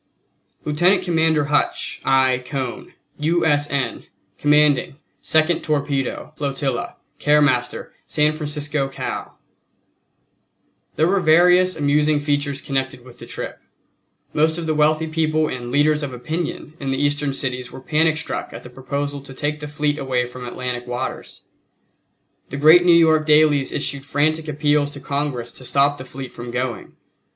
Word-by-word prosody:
LIEUTENANT 175 Hz, +6 st, +3 dB
COMMANDER 160 Hz, -3 st, +2 dB
HUTCH. 145 Hz, +1 st, -1 dB
I. 130 Hz, -1 st, +3 dB
CONE, 130 Hz, -1 st, -5 dB, 0.2 s
U. 165 Hz, +3 st, +1 dB
S. 145 Hz, -1 st, +2 dB
N., 135 Hz, -4 st, -2 dB, 0.3 s
Commanding 150 Hz, -2 st, +3 dB, 0.3 s
Second 160 Hz, +1 st, +2 dB
Torpedo 145 Hz, -1 st, -2 dB
Flotilla, 140 Hz, -3 st, -3 dB, 0.2 s
Care 150 Hz, 0 st, +4 dB
Postmaster, 125 Hz, -4 st, 0 dB
San 150 Hz, 0 st, +2 dB
Francisco, 150 Hz, -2 st, -2 dB
Cal. 135 Hz, -, -6 dB, 1.6 s
There 160 Hz, -, +3 dB
were 195 Hz, +3 st, +2 dB
various 180 Hz, +2 st, +5 dB
amusing 150 Hz, 0 st, +2 dB
features 145 Hz, -1 st, -1 dB
connected 130 Hz, -2 st, -3 dB
with 125 Hz, -1 st, -15 dB
the -, -, -10 dB
trip. -, -, -6 dB, 0.7 s
Most 160 Hz, +2 st, +2 dB
of 170 Hz, -, -4 dB
the 160 Hz, -, 0 dB
wealthy 155 Hz, +1 st, +2 dB
people 155 Hz, -1 st, 0 dB
and 120 Hz, -3 st, -5 dB
"leaders 150 Hz, +3 st, +2 dB
of 145 Hz, -2 st, -4 dB
opinion" 155 Hz, +5 st, -4 dB
in 135 Hz, -, -4 dB
the 135 Hz, -, 0 dB
Eastern 145 Hz, 0 st, 0 dB
cities 125 Hz, -2 st, -4 dB
were -, -, -9 dB
panic 155 Hz, +3 st, +1 dB
struck 160 Hz, -, -5 dB
at -, -, -9 dB
the 125 Hz, -, -11 dB
proposal 140 Hz, +2 st, -4 dB
to 135 Hz, -1 st, -12 dB
take 150 Hz, +2 st, -2 dB
the 150 Hz, -, -6 dB
fleet 150 Hz, 0 st, -1 dB
away 130 Hz, -2 st, 0 dB
from 125 Hz, 0 st, -9 dB
Atlantic 125 Hz, 0 st, -4 dB
waters. 125 Hz, 0 st, -5 dB, 1.1 s
The 140 Hz, -, -5 dB
great 160 Hz, +5 st, +7 dB
New 175 Hz, -, +5 dB
York 160 Hz, -2 st, +4 dB
dailies 150 Hz, -2 st, +4 dB
issued 140 Hz, 0 st, -3 dB
frantic 155 Hz, +3 st, +1 dB
appeals 150 Hz, -1 st, +1 dB
to 145 Hz, -, -9 dB
Congress 140 Hz, -3 st, -3 dB
to -, -, -11 dB
stop 140 Hz, +2 st, +2 dB
the 130 Hz, -, -8 dB
fleet 130 Hz, 0 st, -8 dB
from 120 Hz, 0 st, -8 dB
going. 125 Hz, 0 st, -4 dB
145 Hz, 150 wpm, -21 LUFS, 135-155 Hz, 1.6 s, great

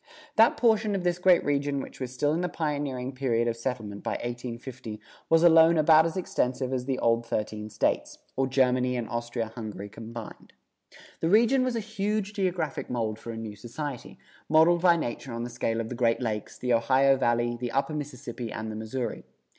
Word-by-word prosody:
That 225 Hz, +1 st, +5 dB
portion 220 Hz, -3 st, +3 dB
of 190 Hz, -, -2 dB
this 175 Hz, 0 st, 0 dB
great 180 Hz, -1 st, +4 dB
region 145 Hz, -1 st, 0 dB
which -, -, -8 dB
was 130 Hz, -2 st, -4 dB
still 145 Hz, +4 st, 0 dB
in 165 Hz, -, 0 dB
the 180 Hz, -, -1 dB
pioneering 145 Hz, -5 st, -3 dB
period 120 Hz, -3 st, 0 dB
of 115 Hz, -, 0 dB
settlement 115 Hz, -4 st, -4 dB
by -, -, -2 dB
1850 120 Hz, -1 st, -6 dB, 0.3 s
was 165 Hz, 0 st, +5 dB
alone 165 Hz, -1 st, +7 dB
about 155 Hz, +1 st, +6 dB
as 165 Hz, -, -5 dB
extensive 130 Hz, -7 st, -1 dB
as 125 Hz, -1 st, -2 dB
the 135 Hz, -1 st, -1 dB
old 115 Hz, 0 st, +2 dB
thirteen 110 Hz, -2 st, -3 dB
States, 110 Hz, -, -1 dB, 0.2 s
or 135 Hz, 0 st, +1 dB
Germany 125 Hz, -1 st, +2 dB
and 120 Hz, -2 st, -3 dB
Austria 120 Hz, -1 st, -3 dB
Hungary 105 Hz, -3 st, -7 dB
combined. 115 Hz, +1 st, -9 dB, 0.7 s
The 165 Hz, -, 0 dB
region 235 Hz, +6 st, +4 dB
was 255 Hz, -2 st, -1 dB
a -, -, 0 dB
huge 210 Hz, -1 st, -2 dB
geographic 185 Hz, -6 st, -2 dB
mold 110 Hz, -3 st, -2 dB
for 115 Hz, -, -9 dB
a 115 Hz, -, -5 dB
new 110 Hz, -2 st, -6 dB
society, 120 Hz, +5 st, -7 dB, 0.3 s
modeled 165 Hz, +2 st, +5 dB
by 175 Hz, -2 st, +5 dB
nature 125 Hz, -3 st, -4 dB
on 115 Hz, 0 st, -3 dB
the 120 Hz, -, -5 dB
scale 115 Hz, -1 st, -1 dB
of 115 Hz, -1 st, -3 dB
the -, -, -4 dB
Great 115 Hz, -1 st, +1 dB
Lakes, 110 Hz, -4 st, -3 dB
the 125 Hz, -1 st, 0 dB
Ohio 130 Hz, +4 st, +4 dB
Valley, 120 Hz, -2 st, +1 dB
the 120 Hz, 0 st, -4 dB
upper 140 Hz, +3 st, 0 dB
Mississippi 130 Hz, -5 st, -5 dB
and 110 Hz, 0 st, -5 dB
the -, -, -6 dB
Missouri. 110 Hz, +2 st, -4 dB
130 Hz, 195 wpm, -27 LUFS, 115-160 Hz, 0.7 s, alone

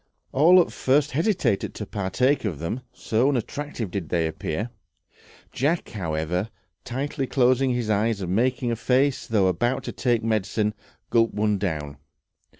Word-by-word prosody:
All 170 Hz, +7 st, +6 dB
at 175 Hz, -, +2 dB
first 145 Hz, +3 st, +2 dB
hesitated 150 Hz, -, 0 dB
to -, -, -5 dB
partake 115 Hz, +8 st, 0 dB
of 100 Hz, -9 st, -2 dB
them, 85 Hz, -, -3 dB
so 125 Hz, +1 st, +1 dB
unattractive 130 Hz, -4 st, -3 dB
did 90 Hz, -5 st, -4 dB
they 85 Hz, -2 st, +1 dB
appear. 80 Hz, +7 st, -3 dB, 0.8 s
Jack, 155 Hz, +6 st, 0 dB
however, 90 Hz, 0 st, -2 dB, 0.3 s
tightly 135 Hz, +2 st, -3 dB
closing 130 Hz, +1 st, +3 dB
his 120 Hz, -3 st, -2 dB
eyes 105 Hz, +1 st, +1 dB
and 90 Hz, -1 st, -2 dB
making 125 Hz, +1 st, +1 dB
a -, -, 0 dB
face 130 Hz, +4 st, +1 dB
as -, -, -17 dB
though 105 Hz, -4 st, +2 dB
about 120 Hz, +8 st, +1 dB
to -, -, -4 dB
take 120 Hz, -3 st, 0 dB
medicine, 110 Hz, -1 st, 0 dB, 0.4 s
gulped 115 Hz, -1 st, +3 dB
one 105 Hz, -1 st, +1 dB
down. 75 Hz, -7 st, -3 dB
115 Hz, 150 wpm, -25 LUFS, 95-130 Hz, 0.8 s, All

